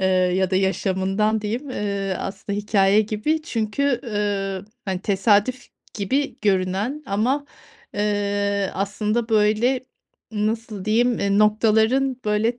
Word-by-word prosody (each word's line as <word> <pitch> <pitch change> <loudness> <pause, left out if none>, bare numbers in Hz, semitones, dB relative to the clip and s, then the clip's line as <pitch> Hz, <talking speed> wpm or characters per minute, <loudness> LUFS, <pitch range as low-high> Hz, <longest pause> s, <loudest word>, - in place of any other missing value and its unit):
eee, 190 - +2
ya 185 0 +2
da 185 - +2
yaşamından 195 +3 +1
diyeyim, 235 +7 -4
eee, 200 -4 -2
aslında 200 +1 -4
hikâye 205 -1 +3
gibi, 220 +9 -1
çünkü, 245 0 -1
eee, 200 -4 -2 0.2
hani, 190 -2 -2
tesadüf 210 +5 +2 0.3
gibi 265 +8 -1
görünen 200 +8 0
ama, 250 +9 0 0.5
eee, 200 -1 0
aslında 210 +4 -1
böyle 225 +4 +2 0.5
nasıl 215 -1 -2
diyeyim 235 +2 +2
e, 200 0 +2
noktaların 220 +5 +3
böyle 215 +3 +1
210 Hz, 115 wpm, -22 LUFS, 195-230 Hz, 0.5 s, hikâye